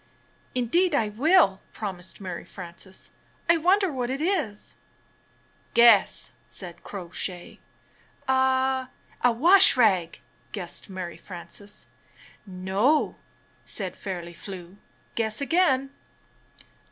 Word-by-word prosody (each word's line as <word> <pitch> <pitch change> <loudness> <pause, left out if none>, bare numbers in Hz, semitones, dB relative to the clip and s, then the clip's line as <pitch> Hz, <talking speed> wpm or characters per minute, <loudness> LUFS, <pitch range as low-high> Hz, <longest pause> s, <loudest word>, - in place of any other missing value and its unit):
"Indeed 305 +8 +2
I 220 -5 +1
will," 245 - +3
promised 190 -4 -5
Mary 185 -3 -6
Frances. 185 +1 -10 0.4
"I 335 - +5
wonder 370 +3 +3
what 250 -3 -3
it 265 +1 -2
is?" 310 - -1 1.0
"Guess!" 235 -4 +5
said 175 -3 -9
Crow 180 -4 -8
Shay. 180 -1 -5 0.7
"A 260 0 +2 0.2
— - - -30
a. 245 - +6
wash 345 +9 +7
rag?" 190 -8 +2 0.3
guessed 180 -3 -3
Mary 185 -2 -6
Frances. 200 +3 -9 0.6
"No," 195 +10 +1 0.5
said 190 -4 -2
Fairly 175 -3 -6
Flew. 180 +1 -10 0.4
"Guess 220 -2 0
again." 280 -3 +2
215 Hz, 105 wpm, -26 LUFS, 185-270 Hz, 1.0 s, wash